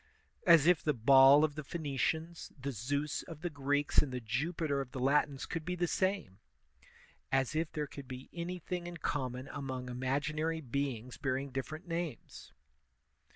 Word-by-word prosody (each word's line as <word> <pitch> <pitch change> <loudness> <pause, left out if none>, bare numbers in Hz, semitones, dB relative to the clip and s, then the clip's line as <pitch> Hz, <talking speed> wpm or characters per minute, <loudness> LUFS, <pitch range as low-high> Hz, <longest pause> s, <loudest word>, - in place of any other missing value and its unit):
As 165 -4 +8
if 175 -2 +5
the 150 -2 +1
Baal 135 +4 +7
of 155 -2 +2
the 155 +1 -6
Phoenicians, 160 +2 -2
the 140 +1 -3
2^us 140 +6 -2
of 165 -3 -9
the 175 - -2
Greeks, 145 0 +2
and 140 - 0
the 125 - -2
Jupiter 140 +5 -1
of 135 -1 -8
the 130 - -4
Latins 140 +1 +2
could 165 - -4
be 180 +3 -2
the 175 0 +1
same! 185 - -1 0.9
As 135 +2 +1
if 160 0 0
there 150 -1 -2
could 140 -1 -10
be 130 0 -8
anything 175 0 -4
in 175 0 -6
common 130 -3 -3
among 130 -3 -5
imaginary 145 +6 -1
beings 130 -3 -3
bearing 135 +1 -2
different 155 +6 -5
names! 165 - -5
145 Hz, 160 wpm, -33 LUFS, 130-160 Hz, 0.9 s, As